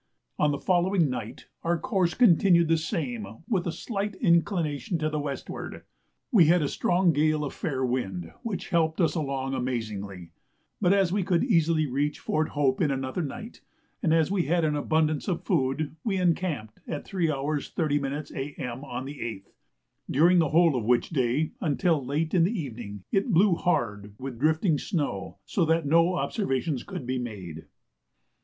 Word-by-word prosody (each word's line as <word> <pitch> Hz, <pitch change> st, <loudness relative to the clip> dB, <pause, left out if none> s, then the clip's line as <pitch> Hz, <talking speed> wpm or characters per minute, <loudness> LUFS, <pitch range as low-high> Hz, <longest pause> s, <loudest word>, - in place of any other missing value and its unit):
On 150 Hz, -, +4 dB
the 145 Hz, -, 0 dB
following 175 Hz, -2 st, +2 dB
night 120 Hz, -1 st, -6 dB, 0.2 s
our 170 Hz, +1 st, +1 dB
course 190 Hz, -6 st, 0 dB
continued 175 Hz, -6 st, +5 dB
the 165 Hz, -, +5 dB
same 125 Hz, -, -4 dB
with 185 Hz, -5 st, 0 dB
a -, -, 0 dB
slight 200 Hz, +3 st, -3 dB
inclination 170 Hz, -2 st, +1 dB
to 155 Hz, -1 st, -1 dB
the 150 Hz, -, -1 dB
westward. 145 Hz, -2 st, -5 dB, 0.5 s
We 200 Hz, -10 st, +6 dB
had 170 Hz, +1 st, +4 dB
a -, -, +1 dB
strong 175 Hz, -1 st, +2 dB
gale 155 Hz, +1 st, +2 dB
of 140 Hz, -, -5 dB
fair 130 Hz, -4 st, -2 dB
wind, 95 Hz, -9 st, -3 dB
which 220 Hz, -5 st, -4 dB
helped 160 Hz, -3 st, +1 dB
us 160 Hz, -4 st, +3 dB
along 135 Hz, -4 st, -2 dB
amazingly; 105 Hz, -8 st, -4 dB, 0.5 s
but 180 Hz, -2 st, +4 dB
as 195 Hz, -3 st, +3 dB
we 205 Hz, -, +1 dB
could 180 Hz, -2 st, +1 dB
easily 165 Hz, -, +3 dB
reach 145 Hz, +2 st, -1 dB
Fort 155 Hz, 0 st, -1 dB
Hope 135 Hz, -3 st, +2 dB
in 155 Hz, -, +3 dB
another 135 Hz, +4 st, -2 dB
night, 225 Hz, -, -7 dB, 0.4 s
and 160 Hz, -, +1 dB
as 165 Hz, +2 st, +3 dB
we 190 Hz, -4 st, +1 dB
had 170 Hz, +1 st, +2 dB
abundance 155 Hz, 0 st, +1 dB
of 180 Hz, -4 st, -1 dB
food, 135 Hz, +4 st, 0 dB
we 200 Hz, -4 st, 0 dB
encamped 170 Hz, -, -1 dB
at 150 Hz, -, -4 dB
3h. 180 Hz, -4 st, 0 dB, 0.5 s
30m. 145 Hz, -2 st, -1 dB
A.M. 135 Hz, -2 st, -5 dB
on 130 Hz, -2 st, -5 dB
the 140 Hz, +1 st, -8 dB
8th, 100 Hz, -4 st, -6 dB, 0.6 s
during 175 Hz, +6 st, +5 dB
the 160 Hz, -3 st, +2 dB
whole 165 Hz, -1 st, +4 dB
of 120 Hz, -, -1 dB
which 120 Hz, +6 st, +2 dB
day, 135 Hz, +1 st, +1 dB
until 160 Hz, -2 st, +1 dB
late 150 Hz, +5 st, -1 dB
in 175 Hz, -, +4 dB
the 200 Hz, +4 st, 0 dB
evening, 110 Hz, -, -7 dB
it 195 Hz, +6 st, +1 dB
blew 190 Hz, +2 st, +5 dB
hard 105 Hz, -, -1 dB
with 130 Hz, -2 st, -7 dB
drifting 155 Hz, +2 st, +2 dB
snow, 100 Hz, -, -3 dB
so 185 Hz, -, 0 dB
that 165 Hz, 0 st, +2 dB
no 165 Hz, +4 st, +4 dB
observations 150 Hz, -, -1 dB
could 125 Hz, -, -7 dB
be 130 Hz, +1 st, -1 dB
made. 95 Hz, -10 st, -7 dB
155 Hz, 170 wpm, -27 LUFS, 130-175 Hz, 0.6 s, We